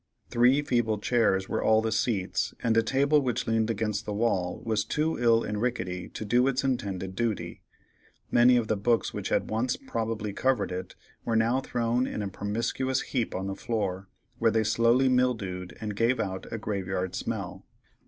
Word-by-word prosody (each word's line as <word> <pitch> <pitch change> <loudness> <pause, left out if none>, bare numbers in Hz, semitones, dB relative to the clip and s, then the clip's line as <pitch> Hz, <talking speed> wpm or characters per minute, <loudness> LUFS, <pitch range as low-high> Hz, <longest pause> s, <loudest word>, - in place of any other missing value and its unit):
Three 125 +4 +4
feeble 120 -5 +1
chairs 105 -4 +1
were - - -1
all 110 0 +5
the 110 0 -1
seats, 110 -3 -1
and 115 -1 +2
a 115 - +5
table 140 +6 +2
which 125 -2 -1
leaned 110 0 +1
against 105 -1 -1
the 105 -1 -4
wall 100 -5 0
was 110 -2 +1
too 155 +7 -1
ill 115 -1 +4
and 105 0 -3
rickety 90 -8 -2
to 110 - -6
do 120 +5 +3
its 135 0 0
intended 95 -8 -2
duty; 105 -7 -2 0.7
many 125 +1 +6
of 115 -2 0
the 110 - +1
books 115 +3 +1
which - - -4
had - - 0
once 115 +4 0
probably 110 - -3
covered 130 0 +1
it, 90 0 -5 0.3
were 115 - -1
now 115 +3 +3
thrown 120 0 0
in 105 - -3
a 100 - -3
promiscuous 115 +7 -1
heap 125 -4 -2
on 95 - -3
the 95 - -3
floor, 100 -5 -3 0.3
where 115 - +4
they 110 0 +2
slowly 115 +4 +3
mildewed 110 -8 0
and 105 -2 -4
gave 115 +3 +2
out 95 -3 -4
a 115 - -2
graveyard 95 -3 -3
smell. - - -5
115 Hz, 185 wpm, -28 LUFS, 100-120 Hz, 0.7 s, many